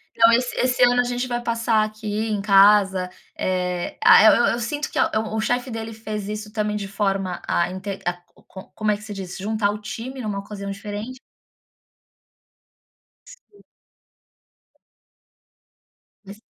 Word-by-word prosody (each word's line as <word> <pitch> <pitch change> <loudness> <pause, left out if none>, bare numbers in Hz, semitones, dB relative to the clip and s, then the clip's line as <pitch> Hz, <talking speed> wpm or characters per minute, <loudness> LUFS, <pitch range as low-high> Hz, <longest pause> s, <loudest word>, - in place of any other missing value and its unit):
Então, 230 0 +6
esse 245 +1 +1
esse 250 0 +2
ano 245 0 +5
a - - 0
gente 245 +1 -2
vai 240 -1 -2
passar 230 -2 +1
aqui 215 0 -3
em 210 -2 -1
casa. 195 -2 +5 0.3
Eh, 180 -1 -2
ah, - - +8
eu 215 - +9 0.2
eu 235 - -2
sinto 290 +5 -3
que - - -6
a - - +3 0.2
o 220 - -1
chefe 245 +3 -1
dele 225 0 -5
fez 215 -2 -6
isso 210 0 -6
também 210 -1 -2
de 205 -1 -4
forma 195 -3 -2
a 170 +1 +1
inte 195 +1 -6
A 175 - +1 0.3
Com 190 - -10
como 215 -1 0
é 205 - 0
que 210 - -15
se 210 -1 -7
diz? 190 -2 -7
Juntar 205 +1 0
o 210 - -5
time 245 +5 -7
numa 210 -3 -3
ocasião 200 0 -7
diferente. 210 +5 -6 2.1
Sim. 485 -4 -18 2.6
Mas 200 +1 -12
210 Hz, 155 wpm, -22 LUFS, 200-230 Hz, 2.6 s, eu